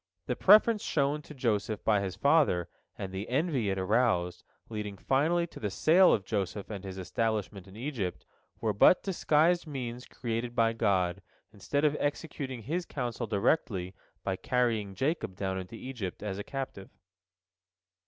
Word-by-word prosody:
The 125 Hz, -, -1 dB
preference 215 Hz, -, +6 dB
shown 145 Hz, 0 st, 0 dB
to 150 Hz, -, -12 dB
Joseph 110 Hz, -4 st, -1 dB
by 105 Hz, -2 st, +3 dB
his 95 Hz, -3 st, -3 dB
father, 140 Hz, -, +3 dB, 0.3 s
and 95 Hz, -, -5 dB
the 95 Hz, +3 st, -5 dB
envy 135 Hz, -, +1 dB
it 95 Hz, -, -1 dB
aroused, 95 Hz, -3 st, +1 dB, 0.2 s
leading 105 Hz, -3 st, -5 dB
finally 155 Hz, -, +2 dB
to 170 Hz, -, -12 dB
the 105 Hz, -, -2 dB
sale 165 Hz, -, +5 dB
of 100 Hz, -, +1 dB
Joseph 100 Hz, 0 st, -3 dB
and 100 Hz, -2 st, -6 dB
his 95 Hz, -1 st, -7 dB
establishment 100 Hz, 0 st, -2 dB
in 95 Hz, -, -14 dB
Egypt, 115 Hz, -7 st, -4 dB, 0.3 s
were 110 Hz, -2 st, 0 dB
but 105 Hz, -, +6 dB
disguised 170 Hz, -2 st, +2 dB
means 125 Hz, -4 st, -5 dB
created 120 Hz, 0 st, -4 dB
by 115 Hz, -1 st, +3 dB
God, 100 Hz, -4 st, +1 dB, 0.3 s
instead 140 Hz, +9 st, -1 dB
of 150 Hz, -1 st, +3 dB
executing 140 Hz, -4 st, -3 dB
His 165 Hz, -, -2 dB
counsel 120 Hz, -3 st, -3 dB
directly 100 Hz, -, 0 dB, 0.3 s
by 95 Hz, -1 st, -1 dB
carrying 115 Hz, -6 st, 0 dB
Jacob 135 Hz, -, -1 dB
down 95 Hz, 0 st, -2 dB
into 95 Hz, +4 st, -8 dB
Egypt 115 Hz, -7 st, -6 dB
as 100 Hz, -2 st, -3 dB
a -, -, -3 dB
captive. 130 Hz, -6 st, -6 dB
115 Hz, 155 wpm, -30 LUFS, 100-140 Hz, 0.3 s, preference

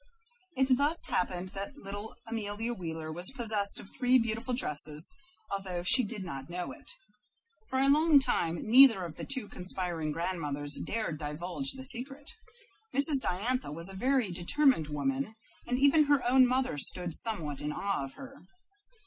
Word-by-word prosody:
It 265 Hz, -1 st, +4 dB
thus 295 Hz, +4 st, +2 dB
happened 180 Hz, 0 st, -1 dB
that 200 Hz, +9 st, -7 dB
little 205 Hz, -1 st, -8 dB
Amelia 225 Hz, 0 st, -3 dB
Wheeler 160 Hz, -5 st, -6 dB
was 175 Hz, +3 st, +1 dB
possessed 215 Hz, -4 st, +1 dB
of 195 Hz, -, -12 dB
three 250 Hz, 0 st, +3 dB
beautiful 230 Hz, +1 st, -1 dB
dresses, 150 Hz, -, 0 dB, 0.4 s
although 190 Hz, -3 st, -3 dB
she 250 Hz, +8 st, +5 dB
did 210 Hz, -2 st, -5 dB
not 135 Hz, -5 st, -7 dB
know 175 Hz, 0 st, -4 dB
it. -, -, -11 dB, 0.8 s
For 260 Hz, -, -1 dB
a 270 Hz, +1 st, +3 dB
long 305 Hz, +2 st, +5 dB
time 170 Hz, -11 st, 0 dB
neither 235 Hz, -4 st, +7 dB
of 165 Hz, -, -7 dB
the -, -, -7 dB
two 260 Hz, -6 st, -4 dB
conspiring 180 Hz, -5 st, -3 dB
grandmothers 150 Hz, -4 st, -3 dB
dared 210 Hz, -9 st, -3 dB
divulge 175 Hz, -, -3 dB
the 265 Hz, 0 st, -9 dB
secret. 270 Hz, +3 st, -1 dB, 0.6 s
Mrs. 280 Hz, -1 st, +4 dB
Diantha 230 Hz, -, -1 dB
was 165 Hz, +4 st, -4 dB
a -, -, -9 dB
very 250 Hz, 0 st, +1 dB
determined 180 Hz, -, +2 dB
woman, 265 Hz, -, -2 dB, 0.3 s
and 250 Hz, -, 0 dB
even 285 Hz, +3 st, +5 dB
her 285 Hz, -4 st, +2 dB
own 255 Hz, +1 st, +6 dB
mother 255 Hz, -, 0 dB
stood 175 Hz, +4 st, 0 dB
somewhat 160 Hz, -, -1 dB
in 150 Hz, 0 st, -3 dB
awe 195 Hz, -1 st, -2 dB
of 135 Hz, -, -12 dB
her. 270 Hz, -8 st, -12 dB
205 Hz, 160 wpm, -30 LUFS, 175-260 Hz, 0.8 s, neither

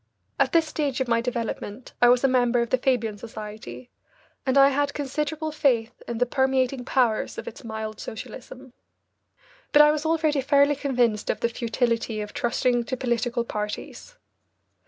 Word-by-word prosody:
At -, -, +3 dB
this 330 Hz, -1 st, +4 dB
stage 290 Hz, -4 st, -2 dB
of 260 Hz, -, -1 dB
my 230 Hz, -1 st, +2 dB
development 235 Hz, -1 st, -4 dB
I 245 Hz, -, +7 dB
was 245 Hz, +1 st, +4 dB
a -, -, +6 dB
member 245 Hz, -2 st, +2 dB
of 235 Hz, -, -7 dB
the 255 Hz, -, +2 dB
Fabian 230 Hz, -5 st, 0 dB
Society, 215 Hz, +2 st, -9 dB, 0.6 s
and 260 Hz, +1 st, +2 dB
I 275 Hz, 0 st, +8 dB
had 285 Hz, +1 st, 0 dB
considerable 300 Hz, +2 st, -2 dB
faith 250 Hz, -6 st, 0 dB
in 235 Hz, -, -3 dB
the 245 Hz, -, +2 dB
permeating 265 Hz, 0 st, 0 dB
powers 245 Hz, -5 st, +1 dB
of -, -, -6 dB
its -, -, -8 dB
mild 220 Hz, -1 st, -5 dB
socialism. 250 Hz, +3 st, -9 dB, 1.0 s
But 295 Hz, -, +8 dB
I 300 Hz, -, +6 dB
was 305 Hz, 0 st, -2 dB
already 315 Hz, -3 st, +1 dB
fairly 285 Hz, +1 st, +4 dB
convinced 245 Hz, -6 st, 0 dB
of -, -, -1 dB
the 235 Hz, -, +2 dB
futility 230 Hz, -1 st, -1 dB
of 210 Hz, 0 st, -6 dB
trusting 240 Hz, 0 st, 0 dB
to 260 Hz, -, -3 dB
political 240 Hz, -1 st, -1 dB
parties. 210 Hz, -, -6 dB
250 Hz, 165 wpm, -25 LUFS, 230-280 Hz, 1.0 s, I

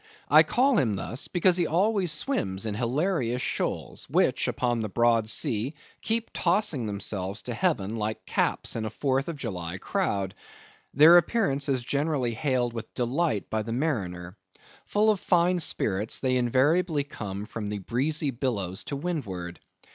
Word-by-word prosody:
I -, -, +8 dB
call 255 Hz, -2 st, +3 dB
him 110 Hz, -5 st, +1 dB
thus, 115 Hz, +7 st, -4 dB
because 180 Hz, 0 st, +3 dB
he 175 Hz, -3 st, +1 dB
always 190 Hz, +1 st, +1 dB
swims 115 Hz, -, -2 dB
in 110 Hz, -, -2 dB
hilarious 125 Hz, -, 0 dB
shoals, -, -, -3 dB
which -, -, +2 dB
upon 120 Hz, -2 st, 0 dB
the 110 Hz, -1 st, -2 dB
broad 115 Hz, +1 st, +2 dB
sea 115 Hz, +7 st, 0 dB, 0.3 s
keep 225 Hz, 0 st, -1 dB
tossing 170 Hz, -, +1 dB
themselves 100 Hz, 0 st, -3 dB
to 125 Hz, -, -4 dB
heaven 115 Hz, -, 0 dB
like 110 Hz, 0 st, -3 dB
caps -, -, 0 dB
in 115 Hz, -, -2 dB
a -, -, -2 dB
Fourth 135 Hz, +1 st, -1 dB
of 170 Hz, -, -3 dB
July 95 Hz, -9 st, -5 dB
crowd. 95 Hz, 0 st, -1 dB, 0.6 s
Their 160 Hz, +5 st, +9 dB
appearance 150 Hz, -7 st, +1 dB
is 130 Hz, -3 st, +1 dB
generally 140 Hz, -3 st, 0 dB
hailed 125 Hz, 0 st, 0 dB
with 115 Hz, -2 st, -7 dB
delight 125 Hz, -, 0 dB
by 110 Hz, -, 0 dB
the 115 Hz, +2 st, -4 dB
mariner. 95 Hz, -, -2 dB, 0.5 s
Full 215 Hz, +1 st, +3 dB
of 205 Hz, -, -1 dB
fine 180 Hz, 0 st, +2 dB
spirits, 105 Hz, -, 0 dB
they 130 Hz, -1 st, +1 dB
invariably 145 Hz, +6 st, +2 dB
come 105 Hz, -8 st, -6 dB
from 105 Hz, -2 st, -5 dB
the 105 Hz, -, -3 dB
breezy 140 Hz, -, 0 dB
billows 110 Hz, -8 st, -2 dB
to 140 Hz, -, -4 dB
windward. 105 Hz, -, -4 dB
125 Hz, 155 wpm, -27 LUFS, 105-160 Hz, 0.6 s, Their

